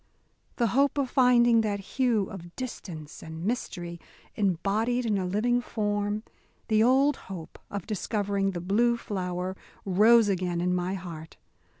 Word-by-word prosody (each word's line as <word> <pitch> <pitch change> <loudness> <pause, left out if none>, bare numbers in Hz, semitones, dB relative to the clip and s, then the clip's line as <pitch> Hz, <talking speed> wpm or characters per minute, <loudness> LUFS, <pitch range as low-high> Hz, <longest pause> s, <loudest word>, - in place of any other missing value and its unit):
The 235 -3 +1
hope 280 +2 +3
of 270 -3 0
finding 240 -3 +5
that 205 -2 -1
hue 230 +1 +1
of 175 -3 -10
distance 175 - -7
and 160 +2 -7
mystery 175 -7 -3 0.3
embodied 210 +6 0
in 210 -3 +1
a 185 - -2
living 240 +6 +1
form, 205 -2 -1 0.5
the 215 -1 +4
old 270 +4 +4
hope 175 -4 -8
of 200 -3 -5
discovering 200 -2 -1
the 175 - -4
Blue 235 +6 +2
Flower 185 -3 -3 0.3
rose 215 +4 +5
again 180 -3 0
in 180 +1 +1
my 180 +1 -1
heart. 165 -4 -8
205 Hz, 140 wpm, -28 LUFS, 180-235 Hz, 0.5 s, finding